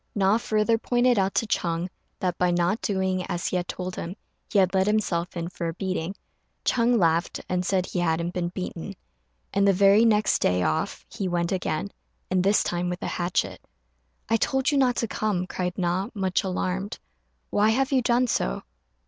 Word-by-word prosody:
Na 200 +2 +3
further 220 +1 +1
pointed 245 -1 +2
out 195 0 0
to - - +2
Ch'êng 170 -4 -1 0.3
that 180 -2 0
by 180 - +3
not 175 +4 +1
doing 190 -2 0
as 175 -2 -3
he - - -1
had 180 0 -1
told 185 0 -4
him, 175 +3 -5 0.4
he - - +1
had 190 -1 +4
let 190 0 +2
himself 180 -5 0
in 170 0 -2
for 170 -1 -4
a 165 - -4
beating. 185 -1 -3 0.5
Ch'êng 240 0 +3
laughed, 170 -2 +1
and 180 0 0
said 185 0 +1
he 180 - -3
hadn't 170 0 0
been 175 -1 -1
beaten; 180 -2 -6 0.6
and 200 0 +3
the 195 - +5
very 200 +3 +5
next 215 -2 +3
day 90 0 +2
off 80 -2 -1
he 195 - -4
went 170 -1 0
again, 155 - -2 0.4
and 185 -1 +2
this 200 +2 +4
time 175 0 -1
with 180 0 -4
a - - -1
hatchet. 175 0 -1 0.7
"I 225 - +3
told 265 +5 +1
you 285 - +2
not 250 -2 +3
to 230 - -1
come," 205 -4 -1
cried 180 -1 -3
Na, 185 +3 0
much 190 -2 0
alarmed; 190 +1 -2 0.5
"why 210 +1 +3
have 265 +5 +1
you 265 -2 +3
done 240 +1 +3
so?" 65 - -1
185 Hz, 190 wpm, -26 LUFS, 175-210 Hz, 0.7 s, the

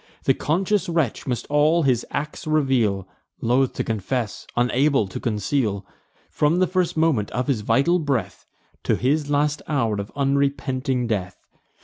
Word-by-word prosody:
The - - +4
conscious 190 +5 0
wretch 165 -9 -1
must 125 -2 -2
all 150 +3 +3
his 125 -4 +2
acts 150 +3 -4
reveal, 125 -11 +1 0.3
Loth 125 +3 +2
to - - -2
confess, 110 +1 -3
unable 125 -1 +2
to 95 - -6
conceal, 105 -2 -1 0.5
From 150 +3 +2
the 185 - +4
first 180 -2 -1
moment 155 -11 +2
of 125 +2 -2
his 130 -7 0
vital 140 +12 +2
breath, 135 - -2 0.4
To - - +3
his 145 +3 0
last 145 +1 +1
hour 115 -9 0
of 100 - -9
unrepenting 135 -2 0
death. 95 -5 -2
135 Hz, 145 wpm, -23 LUFS, 115-150 Hz, 0.5 s, The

